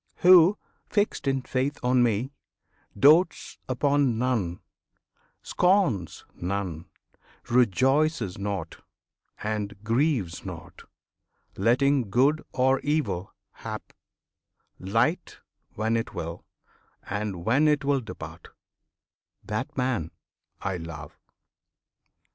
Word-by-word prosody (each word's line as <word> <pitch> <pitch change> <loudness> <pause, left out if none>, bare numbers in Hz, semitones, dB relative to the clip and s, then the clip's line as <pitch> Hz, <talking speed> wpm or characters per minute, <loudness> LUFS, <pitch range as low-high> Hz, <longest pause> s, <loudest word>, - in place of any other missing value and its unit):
Who, 180 +2 +7 0.3
fixed 205 -7 0
in 135 -1 0
faith 135 +3 -1
on 125 0 +3
Me, 120 +2 +1 0.7
Dotes 155 - +4
upon 140 -1 +2
none, 115 -8 -1 0.8
scorns 180 - +1
none; 90 -3 -4 0.6
rejoices 130 - +2
not, 100 -5 -4 0.7
And 105 -2 -4
grieves 115 - 0
not, - - -9 0.7
letting 125 +3 +2
good 140 +8 +2
or 130 +1 +2
evil 110 - -2 0.2
hap - - -8 0.9
Light 115 - 0 0.4
when 110 +2 0
it 115 - -3
will, 85 +1 -6 0.6
and 100 -4 -4
when 140 +7 +3
it 150 -1 +2
will 140 -1 +2
depart, 110 - -9 1.0
That 110 +8 -4
man 125 - -1 0.5
I 95 -1 -2
love! 80 -3 -9
120 Hz, 90 wpm, -26 LUFS, 100-140 Hz, 1.0 s, Who